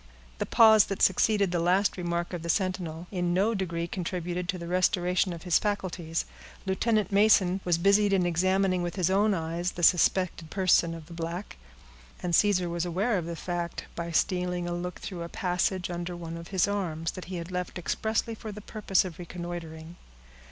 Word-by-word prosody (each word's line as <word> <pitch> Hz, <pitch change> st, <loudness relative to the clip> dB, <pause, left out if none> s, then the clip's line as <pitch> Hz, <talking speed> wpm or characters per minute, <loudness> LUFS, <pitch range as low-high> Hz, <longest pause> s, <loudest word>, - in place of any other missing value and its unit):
The -, -, -2 dB
pause 220 Hz, -3 st, +7 dB
that 195 Hz, -, -2 dB
succeeded 200 Hz, 0 st, +3 dB
the 175 Hz, -, 0 dB
last 185 Hz, +4 st, +2 dB
remark 175 Hz, -1 st, -3 dB
of 175 Hz, -, -4 dB
the 170 Hz, -, -6 dB
sentinel, 180 Hz, -3 st, -1 dB
in 175 Hz, -2 st, 0 dB
no 205 Hz, +5 st, +2 dB
degree 170 Hz, -4 st, -2 dB
contributed 180 Hz, 0 st, -4 dB
to 185 Hz, -, 0 dB
the 170 Hz, -, -7 dB
restoration 180 Hz, +1 st, +1 dB
of 170 Hz, -1 st, -7 dB
his 180 Hz, -3 st, +3 dB
faculties. 180 Hz, -5 st, -2 dB, 0.4 s
Lieutenant 210 Hz, +2 st, +1 dB
Mason 195 Hz, -2 st, +4 dB
was 175 Hz, -2 st, +2 dB
busied 200 Hz, +3 st, +4 dB
in 190 Hz, -2 st, +3 dB
examining 185 Hz, +2 st, +2 dB
with 175 Hz, 0 st, -3 dB
his 185 Hz, -2 st, +1 dB
own 205 Hz, +1 st, +3 dB
eyes 170 Hz, +2 st, -2 dB
the 175 Hz, -, -6 dB
suspected 175 Hz, -1 st, +3 dB
person 175 Hz, -3 st, +2 dB
of 165 Hz, -2 st, -10 dB
the 170 Hz, -, -12 dB
black, 170 Hz, +3 st, -5 dB, 0.7 s
and 175 Hz, -1 st, -2 dB
Caesar 185 Hz, -2 st, +3 dB
was 170 Hz, 0 st, -2 dB
aware 190 Hz, +7 st, 0 dB
of 170 Hz, -, -5 dB
the 170 Hz, -, -4 dB
fact, 175 Hz, +1 st, -4 dB
by 170 Hz, 0 st, -4 dB
stealing 180 Hz, +1 st, 0 dB
a 175 Hz, -, -2 dB
look 180 Hz, 0 st, -4 dB
through 180 Hz, -3 st, -7 dB
a 170 Hz, -, -5 dB
passage 180 Hz, 0 st, -1 dB
under 175 Hz, 0 st, -4 dB
one 165 Hz, -1 st, -6 dB
of 170 Hz, 0 st, -8 dB
his 190 Hz, -1 st, +1 dB
arms, 165 Hz, -5 st, -2 dB
that 185 Hz, -, -8 dB
he 185 Hz, -, -6 dB
had 170 Hz, +1 st, -6 dB
left 180 Hz, 0 st, -4 dB
expressly 220 Hz, +5 st, -1 dB
for 220 Hz, -1 st, -7 dB
the 210 Hz, -, -8 dB
purpose 200 Hz, -2 st, 0 dB
of 175 Hz, -2 st, -8 dB
reconnoitering. 170 Hz, -1 st, -7 dB
180 Hz, 190 wpm, -28 LUFS, 170-195 Hz, 0.7 s, pause